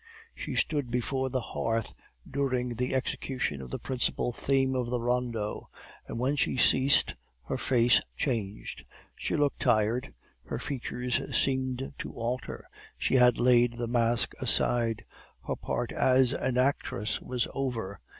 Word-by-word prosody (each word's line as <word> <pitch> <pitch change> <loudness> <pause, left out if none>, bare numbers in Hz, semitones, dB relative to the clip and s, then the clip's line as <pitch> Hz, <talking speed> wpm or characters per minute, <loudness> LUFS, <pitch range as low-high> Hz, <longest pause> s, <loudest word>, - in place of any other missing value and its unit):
"She - - -5
stood 145 -5 0
before 130 +2 -1
the 130 0 0
hearth 115 -1 -1 0.3
during 130 -3 -1
the 125 +3 -1
execution 130 - -2
of 65 - -8
the - - -3
principal 125 -1 -1
theme 135 +1 +1
of 125 -2 -1
the 125 0 -1
rondo; 120 -3 -2 0.4
and - - -5
when 130 +4 +1
she 135 - +1
ceased 130 +2 +4 0.3
her - - -3
face 120 -1 +4 0.2
changed. 110 -7 -3 0.3
She - - -2
looked 145 -1 +1
tired; 115 +1 +2 0.3
her - - -4
features 125 -2 -2 0.2
seemed 130 0 -1
to - - -5
alter. 120 +2 -4 0.3
She - - 0
had 125 -1 +6
laid 120 -1 +4
the 120 0 -3
mask 120 0 +1
aside; 115 -2 +1 0.4
her - - -1
part - - -3
as 130 -1 +4
an 130 -1 -1
actress 125 -5 0
was 125 -2 -1
over. 115 -8 -3
125 Hz, 140 wpm, -29 LUFS, 115-130 Hz, 0.4 s, had